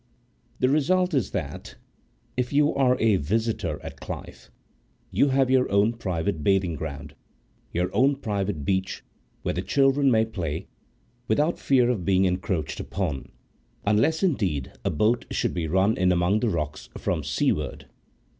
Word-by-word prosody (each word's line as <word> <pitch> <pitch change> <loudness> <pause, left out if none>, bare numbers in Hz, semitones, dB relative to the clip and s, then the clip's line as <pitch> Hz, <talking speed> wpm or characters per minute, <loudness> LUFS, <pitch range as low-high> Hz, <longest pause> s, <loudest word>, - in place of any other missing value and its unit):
The 130 - +2
result 180 +6 +2
is 130 -9 +1
that, 75 -8 -5 0.6
if 125 -1 -1
you 145 +1 +3
are 130 -2 +3
a 110 -3 +4
visitor 95 -2 -1
at - - -8
Clyffe, - - -8 0.6
you 140 - +3
have 135 -1 +2
your 130 -4 +3
own 100 +3 +3
private 85 -8 -2
bathing 95 -2 +2
ground, 75 -1 -6 0.6
your 90 +2 -1
own 140 +2 +4
private 100 - -3
beach 95 +2 -1 0.4
where - - -1
the - - -2
children 135 0 +3
may 110 -2 +4
play, 85 -8 -4 0.6
without 150 +10 +1
fear 125 -3 +3
of 105 -8 -2
being 95 +1 +3
encroached 90 -4 -1
upon, 80 -9 -3 0.5
unless, 115 - +2
indeed, 95 - 0
a - - +1
boat 110 +9 +1
should - - -1
be 85 -3 -2
run 95 +6 +2
in 90 0 +2
among 90 +4 +2
the 120 - +1
rocks 75 -8 -3
from 80 -4 -1
seaward. 75 0 -1
100 Hz, 150 wpm, -25 LUFS, 85-125 Hz, 0.6 s, a